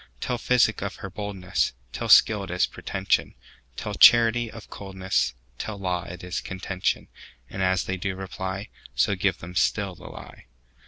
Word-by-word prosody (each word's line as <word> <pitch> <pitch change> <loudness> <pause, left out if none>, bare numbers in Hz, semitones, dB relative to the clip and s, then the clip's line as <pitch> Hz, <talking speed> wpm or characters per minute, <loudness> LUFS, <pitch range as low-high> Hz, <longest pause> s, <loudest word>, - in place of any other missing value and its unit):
Tell 125 - -2
physic 125 0 +3
of - - -3
her 95 - -8
boldness; 100 -2 -2 0.2
Tell - - -4
skill 105 -2 +7
it - - -12
is 90 0 +2
pretension; 95 0 -1 0.4
Tell - - -4
charity 120 0 +6
of 110 -1 -11
coldness; 95 -8 -1 0.2
Tell 110 -2 -4
law 90 -3 -2
it 90 0 -9
is 90 +1 -3
contention:And 95 -6 -4
as 95 0 +2
they 95 - -3
do 95 +1 -3
reply, 95 +1 -5 0.3
So 60 - +3
give - - +1
them 90 +2 -9
still 100 +1 +1
the - - -15
lie. - - -11
95 Hz, 160 wpm, -25 LUFS, 90-105 Hz, 0.4 s, skill